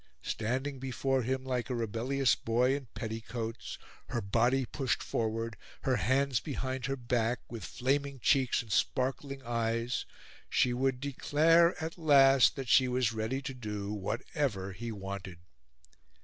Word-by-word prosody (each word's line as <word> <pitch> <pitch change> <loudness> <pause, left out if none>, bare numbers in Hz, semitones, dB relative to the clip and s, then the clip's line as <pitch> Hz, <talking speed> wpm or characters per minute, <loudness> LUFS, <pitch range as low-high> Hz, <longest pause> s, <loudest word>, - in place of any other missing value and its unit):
Standing 130 +5 -2
before 135 0 0
him 130 +2 -1
like 125 -1 -2
a 125 - -1
rebellious 120 +3 +1
boy 125 +4 +2
in 140 -3 -6
petticoats, 115 +1 -5 0.3
her - - -2
body 120 +6 +2
pushed 130 0 -1
forward, 115 -1 -2 0.3
her 130 -2 +2
hands 130 +5 +2
behind 130 -2 -3
her 135 - -1
back, 120 -1 0
with 115 -4 -6
flaming 140 +5 -1
cheeks 130 0 +3
and 110 - -12
sparkling 135 +3 0
eyes, 115 0 -1 0.4
she 125 - +3
would 130 0 0
declare 160 +5 +4
at 165 +2 -5
last 135 -4 +6
that 135 -2 -5
she 130 +2 +5
was 125 -2 +1
ready 110 +5 -2
to 135 0 -4
do 105 -4 -4
whatever 105 0 -2
he 115 +4 -5
wanted. 95 -3 -6
125 Hz, 140 wpm, -31 LUFS, 115-135 Hz, 0.4 s, last